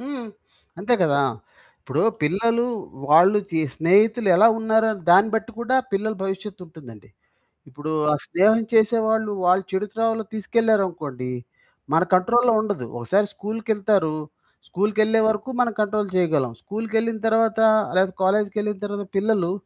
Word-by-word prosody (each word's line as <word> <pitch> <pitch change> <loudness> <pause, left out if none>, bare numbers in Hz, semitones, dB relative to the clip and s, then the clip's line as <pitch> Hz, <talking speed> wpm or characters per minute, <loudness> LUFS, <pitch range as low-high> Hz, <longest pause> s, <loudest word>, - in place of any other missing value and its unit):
హ్మ్. 260 -2 -7 0.5
అంతే 215 +6 +1
కదా! 140 -4 +2 0.6
ఇప్పుడు 145 +5 -2 0.2
పిల్లలు 230 +9 +1 0.5
వాళ్ళు 180 +7 +6
చే 160 -1 0
స్నేహితులు 205 +6 +2
ఎలా 215 +5 +6
ఉన్నారో 220 0 +2 0.2
దాన్ని 195 +5 +5
బట్టి 225 +2 -2
కూడా 245 +2 0 0.2
పిల్లల 215 +2 -1
భవిష్యత్తుంటుందండి. 180 - -8 0.6
ఇప్పుడు 150 +4 -7 0.2
ఆ - - +3
స్నేహం 215 +5 +3
చేసేవాళ్ళు 220 -1 +2
వాళ్ళు 185 +2 +3
చెడు 190 +2 -2
త్రోవలో 225 -1 -1
తీసుకెళ్లారనుకోండి, 190 - -1 0.6
మన 165 - +4
కంట్రోల్‌లో 235 +6 +3
ఉండదు. 205 - -4
ఒకసారి 195 - +1
స్కూలుకెళ్తారు, 210 -6 -1 0.5
స్కూలుకెళ్ళే 215 +3 +1
వరకు 215 +3 -3
మనం 235 -2 0
కంట్రోల్ 210 -1 -1
చేయగలం. 155 -9 0
స్కూలుకెళ్ళిన 220 +2 -3
తర్వాత 225 0 +1 0.4
లేదా 190 0 +2
కాలేజికెళ్ళిన 210 +1 0
తరువాత 205 0 -5
పిల్లలు 195 -4 0
210 Hz, 120 wpm, -22 LUFS, 180-220 Hz, 0.6 s, వాళ్ళు